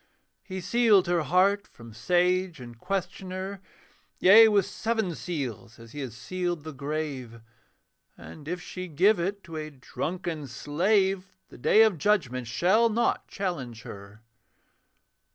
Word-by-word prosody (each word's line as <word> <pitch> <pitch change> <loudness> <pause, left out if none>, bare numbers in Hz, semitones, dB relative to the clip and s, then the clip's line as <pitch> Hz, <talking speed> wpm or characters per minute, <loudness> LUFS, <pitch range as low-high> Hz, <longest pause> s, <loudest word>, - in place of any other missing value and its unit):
He 190 -1 -6
sealed 220 -2 +4
her 175 -1 +1
heart 185 +7 +2
from 115 -1 -14
sage 180 - +1
and 120 -2 -11
questioner 190 +1 -4 0.6
Yea, 220 +5 +8
with 205 -3 +3
seven 215 -1 -2
seals, 125 - -5
as 115 -1 -14
he 145 - -8
has 125 -5 -6
sealed 175 +3 -3
the 155 -1 -7
grave. 140 -4 -5 0.8
And 150 -2 -12
if 175 +2 -3
she 185 0 -7
give 180 +6 +3
it 195 +3 -3
to 165 -3 -8
a 155 0 -5
drunken 155 +3 -5
slave, 190 - 0
The - - -14
Day 220 - +5
of 210 -7 +2
Judgment 135 - 0
shall 190 - +3
not 230 +2 0
challenge 130 - -4
her. 100 +2 -11
175 Hz, 135 wpm, -27 LUFS, 135-190 Hz, 0.8 s, Yea